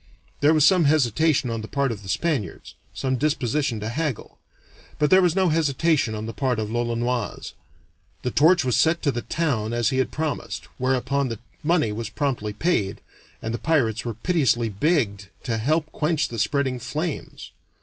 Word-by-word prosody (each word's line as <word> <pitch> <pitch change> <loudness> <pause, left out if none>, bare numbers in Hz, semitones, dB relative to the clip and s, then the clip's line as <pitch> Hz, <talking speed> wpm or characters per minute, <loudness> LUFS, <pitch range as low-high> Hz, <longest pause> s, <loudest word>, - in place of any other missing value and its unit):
There 150 +2 +4
was 150 -2 +5
some 180 -2 +5
hesitation 145 -1 +2
on 115 -1 -3
the 110 - -7
part 140 0 0
of 105 -3 -6
the 95 - -10
Spaniards, 135 - -2 0.2
some 130 -1 -1
disposition 145 -3 0
to 110 - -3
haggle, 145 -1 -4 0.6
but 150 -1 +1
there 190 0 +7
was 175 -2 +2
no 190 -2 +3
hesitation 155 -5 +1
on 105 0 -4
the 115 - -5
part 125 +3 0
of 110 -1 -3
l'Olonoise. 120 -1 -2 0.7
The 125 - -1
torch 160 +3 +4
was 125 -4 +1
set 160 +7 +2
to 145 - +2
the 120 - -3
town 120 -10 -1
as 120 -1 +1
he 130 - 0
had 130 - +1
promised, 155 -1 -4
whereupon 130 +1 0
the 115 - -4 0.2
money 155 -7 +2
was 110 +1 -4
promptly 110 -1 -2
paid, 105 - 0 0.4
and 110 - -3
the 120 - -3
pirates 115 -9 +1
were 115 -3 -4
piteously 120 - +1
begged 100 - 0 0.2
to 115 -2 -1
help 155 +6 0
quench 155 -1 0
the 115 - -5
spreading 130 +1 0
flames. 155 +4 -5
130 Hz, 180 wpm, -24 LUFS, 115-155 Hz, 0.7 s, there